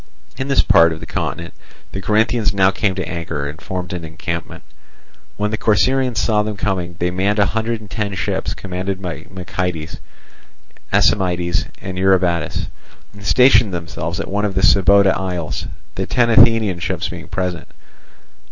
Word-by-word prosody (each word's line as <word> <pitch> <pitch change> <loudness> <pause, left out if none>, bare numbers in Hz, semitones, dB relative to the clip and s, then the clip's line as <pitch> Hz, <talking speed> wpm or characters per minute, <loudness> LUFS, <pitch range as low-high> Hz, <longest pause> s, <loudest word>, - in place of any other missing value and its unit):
In 130 - -4
this 135 - +3
part 85 0 +5
of 80 - -5
the - - -8
continent 85 0 -4 0.4
the 95 - -5
Corinthians 110 +1 +1
now 95 -1 +4
came 100 -1 0
to 95 - -3
anchor, 85 -5 -4
and 75 +3 -8
formed 90 -1 -5
an 90 -2 -5
encampment. 85 +1 -5 0.7
When 105 0 -1
the 110 - -2
Corcyraeans 125 +3 +2
saw 105 -2 +2
them 105 -1 -4
coming, 90 -3 -2
they 90 +1 0
manned 95 +3 0
a 100 - +4
hundred 110 +2 -2
and 105 - -13
ten 105 -3 -2
ships, 90 - -2
commanded 95 0 -4
by 85 -4 -6
Meikiades, 90 -3 -4 0.9
Aisimides, 90 -2 +2 0.2
and 95 -1 -5
Eurybatus, 90 -4 +1 0.5
and 100 0 -13
stationed 110 -3 +5
themselves 85 0 -4
at - - -3
one 100 +1 -1
of 100 -2 -1
the 95 - +1
Sybota 95 +3 +5
isles; 90 -4 -3 0.3
the - - -3
ten 120 -1 +2
Athenian 110 -5 +5
ships 85 - -2
being - - -8
present. 90 -2 -3
95 Hz, 160 wpm, -19 LUFS, 85-105 Hz, 0.9 s, part